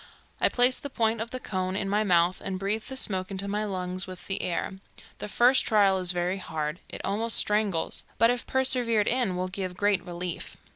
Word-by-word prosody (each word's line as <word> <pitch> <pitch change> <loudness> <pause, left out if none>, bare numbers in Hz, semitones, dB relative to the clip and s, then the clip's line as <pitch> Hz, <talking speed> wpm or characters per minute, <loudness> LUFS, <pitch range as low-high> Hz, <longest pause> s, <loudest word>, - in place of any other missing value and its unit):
I - - +3
place 250 +1 +4
the 285 - -6
point 225 -3 +1
of 230 - -4
the 255 - -5
cone 185 -4 -3
in 195 0 -1
my 205 +2 +1
mouth, 175 -2 +3
and 190 - -3
breathe 200 +3 -1
the 265 - -6
smoke 185 -6 -1
into 195 0 -4
my 210 +1 -1
lungs 185 -2 -3
with 185 -1 -10
the 195 - -1
air. 180 +2 -3 0.4
The - - -5
first 245 +5 +4
trial 200 -4 +4
is 180 -1 +2
very 180 +2 -1
hard; 155 -1 -4
it - - -7
almost 225 +4 +1
strangles, 210 -5 +1
but 230 +1 +5
if 245 -1 -3
persevered 245 -5 +1
in 240 -7 +1
will 180 +1 -1
give 185 -1 -5
great 205 -2 +2
relief. 175 0 -5
195 Hz, 205 wpm, -27 LUFS, 185-225 Hz, 0.4 s, but